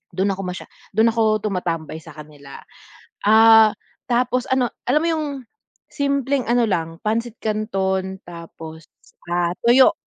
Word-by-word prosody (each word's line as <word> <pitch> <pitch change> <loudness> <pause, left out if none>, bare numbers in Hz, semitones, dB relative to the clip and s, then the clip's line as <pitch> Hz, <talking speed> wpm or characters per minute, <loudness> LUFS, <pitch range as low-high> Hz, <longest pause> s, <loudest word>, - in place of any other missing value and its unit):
Dun 195 +2 +1
ako 195 0 -4
masya 180 0 -6 0.3
dun 225 +2 +4
ako 220 -1 +1
tumatambay 170 -6 -3
sa 165 -4 -13
kanila. 150 -2 -12 0.7
Ah, 220 0 +7 0.4
tapos 250 +1 +1
ano, 260 -2 +1 0.2
alam 295 +5 +2
mo 335 - +1
yung, 310 -1 -2 0.7
simpleng 280 -2 -1
ano 240 0 +3
lang, 165 -2 -2
pansit 230 +1 -2
kanon 190 -3 -2
tapos, 165 -1 -10 0.4
ah, 175 0 0
tuyo. 250 +2 +6
215 Hz, 130 wpm, -21 LUFS, 175-240 Hz, 0.7 s, Ah